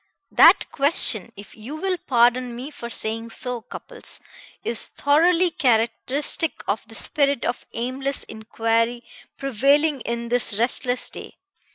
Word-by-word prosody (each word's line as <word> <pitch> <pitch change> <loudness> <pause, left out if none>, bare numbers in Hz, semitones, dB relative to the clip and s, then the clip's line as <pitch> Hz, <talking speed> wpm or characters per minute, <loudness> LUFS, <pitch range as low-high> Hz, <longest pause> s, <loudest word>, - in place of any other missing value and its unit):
"That - - +6
question, 255 - +4
if 200 0 -12
you 230 +7 -8
will 365 +2 -2
pardon 245 0 +2
me 260 +5 -7
for 235 -5 -8
saying 225 0 -4
so, 245 +1 -4
Cupples, - - -8 0.4
is 230 - -1
thoroughly 335 +5 +2
characteristic 255 +5 +1
of - - -2
the - - -10
spirit 280 -3 0
of - - -4
aimless 260 +4 -3
inquiry 230 +2 -2 0.3
prevailing 275 +3 +1
in 235 +1 -4
this 235 -4 +1
restless 250 +2 +2
day. - - -11
245 Hz, 130 wpm, -22 LUFS, 230-285 Hz, 0.4 s, That